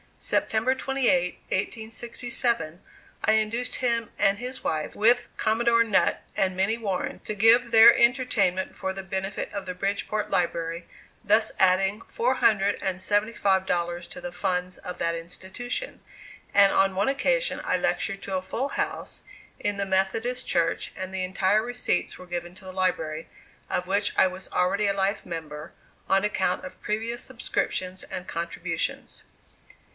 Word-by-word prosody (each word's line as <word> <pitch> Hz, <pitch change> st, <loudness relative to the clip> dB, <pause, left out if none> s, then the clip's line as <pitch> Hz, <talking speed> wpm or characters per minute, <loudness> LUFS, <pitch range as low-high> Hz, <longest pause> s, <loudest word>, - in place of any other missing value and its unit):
September 225 Hz, +4 st, +1 dB
28, 255 Hz, -10 st, +1 dB
1867, 230 Hz, -3 st, -2 dB, 0.4 s
I 215 Hz, -, +4 dB
induced 220 Hz, +3 st, 0 dB
him 235 Hz, -3 st, 0 dB
and 200 Hz, -1 st, +4 dB
his 250 Hz, +2 st, -6 dB
wife, 155 Hz, -1 st, -2 dB
with 240 Hz, +3 st, +4 dB
Commodore 230 Hz, +1 st, +3 dB
Nutt 210 Hz, -5 st, +2 dB
and 185 Hz, -1 st, +1 dB
Minnie 195 Hz, +5 st, +1 dB
Warren 195 Hz, -5 st, -3 dB
to 215 Hz, -, -4 dB
give 230 Hz, +3 st, +5 dB
their 225 Hz, -1 st, +9 dB
entertainment 235 Hz, -7 st, +2 dB
for 190 Hz, -, -3 dB
the 195 Hz, 0 st, -6 dB
benefit 190 Hz, +1 st, -4 dB
of 200 Hz, -1 st, -5 dB
the 180 Hz, -, -4 dB
Bridgeport 200 Hz, +3 st, -2 dB
Library, 170 Hz, -1 st, -1 dB, 0.4 s
thus 215 Hz, +1 st, +3 dB
adding 190 Hz, +2 st, +3 dB
$475 195 Hz, -5 st, +1 dB
to 270 Hz, -, -9 dB
the 265 Hz, 0 st, -5 dB
funds 180 Hz, -3 st, -2 dB
of 180 Hz, -, -7 dB
that 170 Hz, 0 st, 0 dB
institution; 190 Hz, -, -6 dB, 0.5 s
and 200 Hz, -1 st, +6 dB
on 195 Hz, -1 st, +3 dB
one 200 Hz, +2 st, +1 dB
occasion -, -, +1 dB
I -, -, +1 dB
lectured 195 Hz, -2 st, -1 dB
to 195 Hz, -, -3 dB
a -, -, -2 dB
full 265 Hz, +8 st, -2 dB
house -, -, -4 dB, 0.4 s
in 205 Hz, -1 st, -1 dB
the 200 Hz, -, -1 dB
Methodist 220 Hz, +7 st, 0 dB
Church, 165 Hz, -1 st, 0 dB
and 185 Hz, 0 st, -5 dB
the 190 Hz, -1 st, -1 dB
entire 190 Hz, +3 st, +2 dB
receipts 245 Hz, -6 st, -1 dB
were 185 Hz, -, -11 dB
given 175 Hz, 0 st, -4 dB
to 190 Hz, 0 st, -13 dB
the 185 Hz, -, -7 dB
library, 165 Hz, -4 st, -1 dB, 0.4 s
of 180 Hz, -, -1 dB
which 200 Hz, +2 st, +1 dB
I 190 Hz, -, +6 dB
was 185 Hz, +1 st, -8 dB
already 200 Hz, +3 st, +1 dB
a 200 Hz, -, +2 dB
life 195 Hz, +1 st, 0 dB
member, 155 Hz, -3 st, -7 dB, 0.4 s
on 195 Hz, +1 st, +3 dB
account 195 Hz, -3 st, 0 dB
of 185 Hz, -, -10 dB
previous 225 Hz, +3 st, -3 dB
subscriptions 185 Hz, -6 st, -3 dB
and 180 Hz, 0 st, -7 dB
contributions. 170 Hz, +1 st, -4 dB
195 Hz, 145 wpm, -26 LUFS, 185-230 Hz, 0.5 s, their